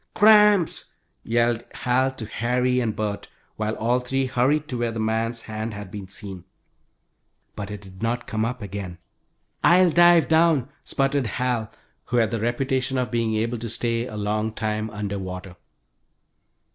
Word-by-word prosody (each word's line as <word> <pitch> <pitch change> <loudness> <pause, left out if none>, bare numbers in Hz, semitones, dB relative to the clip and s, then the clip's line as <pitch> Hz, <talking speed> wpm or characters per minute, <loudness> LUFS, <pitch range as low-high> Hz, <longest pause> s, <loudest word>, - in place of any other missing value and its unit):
"Cramps," 210 -4 +5 0.4
yelled 120 0 +1
Hal 130 +2 +1
to 115 - -5
Harry 125 +3 0
and 115 -4 -1
Bert, 105 -1 -3 0.3
while 110 0 -2
all 120 +3 +1
three 135 +2 -1
hurried 135 +4 +1
to 125 - -3
where 120 -1 0
the 115 - -5
man's 115 +1 -1
hand 110 0 -5
had 100 -2 -8
been 100 -2 -7
seen. 95 -2 -7 1.1
But 100 -1 -5
it 105 -1 -7
did 95 -1 -14
not 120 +2 -1
come 110 0 -2
up 120 0 -3
again. 95 -3 -6 0.7
"I'll 180 0 +6
dive 175 0 +6
down!" 160 -5 +3
spluttered 135 -2 0
Hal, 120 +1 -1 0.3
who 120 - -1
had 110 -2 +3
the 115 - -1
reputation 130 +3 0
of 125 -1 -1
being 115 -2 0
able 115 +2 -1
to 115 0 -5
stay 115 +2 -1
a 105 - -7
long 105 +1 -1
time 110 0 -2
under 105 -1 -4
water. 95 -1 -7
115 Hz, 160 wpm, -24 LUFS, 105-125 Hz, 1.1 s, I'll